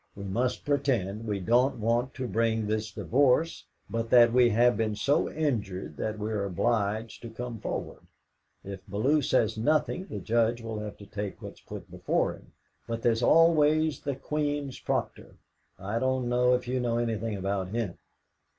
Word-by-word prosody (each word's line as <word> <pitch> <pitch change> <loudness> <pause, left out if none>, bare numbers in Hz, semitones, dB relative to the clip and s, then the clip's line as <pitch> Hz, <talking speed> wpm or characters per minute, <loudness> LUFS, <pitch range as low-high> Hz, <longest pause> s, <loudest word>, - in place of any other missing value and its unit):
We 100 - -8
must 120 +6 -1
pretend 115 -7 0
we 105 -2 -1
don't 120 +7 +2
want 120 +4 0
to 130 -1 -3
bring 115 -1 0
this 110 +1 -2
divorce, 140 +5 +1 0.2
but 115 0 -3
that 120 -1 +6
we 125 -1 +5
have 120 +2 +4
been 110 -1 -1
so 140 +8 +1
injured 100 - -2
that 110 0 -3
we 105 +1 -3
are 105 -2 -1
obliged 110 +3 -1
to 115 - -7
come 115 0 -6
forward. - - -5 0.6
If 100 -1 -7
Bellew 130 +10 +2
says 110 -4 +1
nothing, 155 - +1
the - - -6
Judge 115 +1 +1
will 115 -2 -5
have 105 -1 -6
to 100 - -12
take 100 -1 -5
what's - - -10
put - - -10
before - - 0
him. - - -16 0.4
But 115 0 -4
there's 115 -1 +2
always 155 +1 +4
the 140 -2 -3
Queen's 145 0 -3
Proctor. - - -3 0.4
I 105 +4 -3
don't 130 0 0
know 125 +1 +3
if 125 0 -4
you 130 +1 0
know 120 -1 0
anything 115 -2 -2
about 95 0 -2
him?" 105 -2 -3
115 Hz, 170 wpm, -28 LUFS, 105-130 Hz, 0.6 s, that